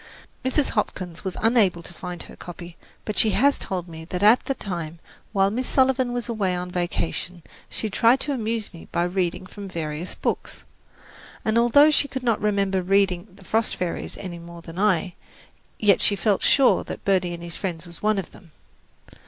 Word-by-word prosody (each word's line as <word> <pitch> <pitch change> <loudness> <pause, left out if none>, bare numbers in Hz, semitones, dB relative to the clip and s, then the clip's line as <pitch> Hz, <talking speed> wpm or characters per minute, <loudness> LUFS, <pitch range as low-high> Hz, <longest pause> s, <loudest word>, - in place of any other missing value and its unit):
Mrs. 265 +2 +1
Hopkins 185 -5 -3
was 190 -2 -4
unable 215 -7 +3
to 175 - -9
find 180 0 -6
her - - -13
copy; 175 -1 -9 0.3
but 215 - -1
she 220 - +5
has 280 +5 +4
told 180 -2 -4
me 160 -1 -9
that 180 +3 -3
at 220 +4 +6
that 270 - -2
time, 170 -4 -4 0.3
while 195 -1 +3
Miss 250 +4 -2
Sullivan 260 -2 +3
was 245 -1 -2
away 205 -6 0
on 180 0 -4
a - - -10
vacation, 175 0 -3 0.3
she 220 - -3
tried 230 +5 +4
to 295 - -2
amuse 225 -4 -2
me 165 - -11
by 170 - +1
reading 180 0 -1
from 200 +1 -9
various 165 -1 -4
books, - - -3 0.8
and 220 - +1
although 265 +6 +6
she 290 - +4
could 265 -2 -5
not 230 -3 +1
remember 200 -2 +1
reading 190 0 +2
"The 195 -1 -17
Frost 225 +3 +1
Fairies" 180 -2 -4
any 175 -3 -7
more 170 0 -11
than 165 +2 -8
I, 190 -3 +2 0.6
yet 205 -3 +4
she 205 - +4
felt 200 +1 +1
sure 275 -2 +4
that - - -8
"Birdie 180 -3 +2
and 170 - -10
His 170 -1 -6
Friends" 175 -3 -4
was 170 -1 -11
one 215 0 +2
of 195 - -4
them. 170 -6 -17
195 Hz, 195 wpm, -24 LUFS, 175-225 Hz, 0.8 s, at